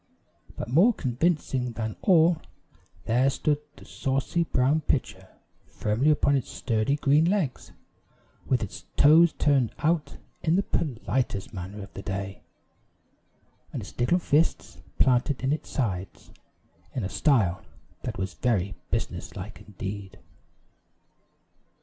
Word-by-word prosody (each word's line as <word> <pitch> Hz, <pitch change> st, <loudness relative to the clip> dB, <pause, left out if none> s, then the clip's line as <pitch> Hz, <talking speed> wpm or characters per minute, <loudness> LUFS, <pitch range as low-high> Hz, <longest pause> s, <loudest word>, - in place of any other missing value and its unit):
But -, -, -5 dB
more 175 Hz, -, +5 dB
convincing 130 Hz, -, 0 dB
than 110 Hz, -3 st, -3 dB
all, 165 Hz, -2 st, +4 dB, 0.6 s
there 125 Hz, +4 st, +3 dB
stood 145 Hz, +1 st, 0 dB, 0.2 s
the -, -, -14 dB
saucy 135 Hz, +5 st, -1 dB
brown 140 Hz, +2 st, +2 dB
pitcher 145 Hz, -3 st, -2 dB, 0.4 s
firmly 110 Hz, +8 st, 0 dB
upon 145 Hz, -2 st, +3 dB
its 135 Hz, -, -1 dB
sturdy 115 Hz, +3 st, 0 dB
green 145 Hz, +2 st, +3 dB
legs, 180 Hz, -7 st, -1 dB, 0.8 s
with 125 Hz, -3 st, +1 dB
its 100 Hz, -, -8 dB
toes 160 Hz, +3 st, +7 dB
turned 135 Hz, -6 st, +2 dB
out 155 Hz, 0 st, 0 dB, 0.2 s
in 160 Hz, +1 st, +2 dB
the 195 Hz, -, +2 dB
politest 125 Hz, -, -2 dB
manner 100 Hz, +2 st, -6 dB
of 100 Hz, -, -13 dB
the -, -, -7 dB
day, 95 Hz, 0 st, -5 dB, 1.3 s
and -, -, -4 dB
its -, -, -11 dB
little 125 Hz, +9 st, +3 dB
fists 165 Hz, -2 st, 0 dB, 0.2 s
planted 130 Hz, +1 st, +2 dB
in 135 Hz, +2 st, +2 dB
its 155 Hz, -, -5 dB
sides 95 Hz, -8 st, -3 dB, 0.6 s
in 125 Hz, -, -1 dB
a -, -, -1 dB
style 105 Hz, -, +2 dB, 0.4 s
that -, -, -5 dB
was 95 Hz, +1 st, -3 dB
very 100 Hz, -6 st, 0 dB, 0.2 s
business -, -, -3 dB
like -, -, -8 dB
indeed. 100 Hz, -1 st, -7 dB
130 Hz, 125 wpm, -27 LUFS, 105-155 Hz, 1.3 s, toes